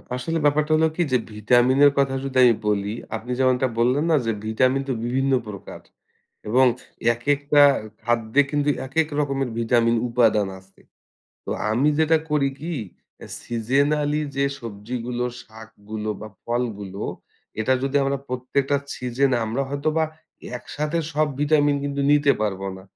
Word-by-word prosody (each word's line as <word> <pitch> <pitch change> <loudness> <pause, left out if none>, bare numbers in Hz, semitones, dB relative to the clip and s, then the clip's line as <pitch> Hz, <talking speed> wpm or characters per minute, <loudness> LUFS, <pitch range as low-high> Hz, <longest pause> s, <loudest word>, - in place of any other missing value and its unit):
আসলে 145 +7 -2
ব্যাপারটা 150 +1 +2
হলো 160 +1 +3
কি 175 - -1
যে, 130 - +4
ভিটামিন 120 +5 +3
এর 145 - +7
কথা 135 -1 +2
যদি 135 -1 -3
আমি 120 -2 +6
বলি 105 0 0 0.2
আপনি 115 +3 -6
যেমনটা 130 0 +3
বললেন 130 +6 +2
না - - +5
যে, 115 - +1
ভিটামিন 130 +5 +2
তো - - +1
বিভিন্ন 135 +3 0 0.2
প্রকার 100 -2 -9 0.7
এবং 130 +4 +4 0.5
একেকটা 145 +4 +2 0.4
খাদ্যে 120 +2 +2
কিন্তু 145 -1 +1 0.2
একেক 155 +4 +1
রকমের 135 -3 -1
ভিটামিন 115 0 +2
উপাদান 115 -4 +3
আছে। 95 +1 -24 0.6
তো - - -5 0.2
আমি 125 +7 +2
যেটা 160 0 +4
করি 145 -2 +2
কি 165 +3 -4 0.7
সিজেনালি 145 +6 0 0.2
যে, 140 - +2 0.2
সবজিগুলো, 120 +3 -4 0.2
শাকগুলো 110 -1 -8
বা 110 - -7 0.2
ফলগুলো 105 -5 -3 0.6
এটা 110 +4 +2
যদি 135 +1 0
আমরা 140 0 0
প্রত্যেকটা 130 +3 0 0.2
সিজন 125 +2 0
আমরা 115 +5 -1
হয়তোবা 155 +3 0 0.5
একসাথে 150 +6 -3
সব 155 +1 +2
ভিটামিন 145 -1 +3
কিন্তু 140 0 -2
নিতে 145 -1 +5
পারব 100 -3 -2 0.2
না। 95 - -12
130 Hz, 140 wpm, -23 LUFS, 115-145 Hz, 0.7 s, এর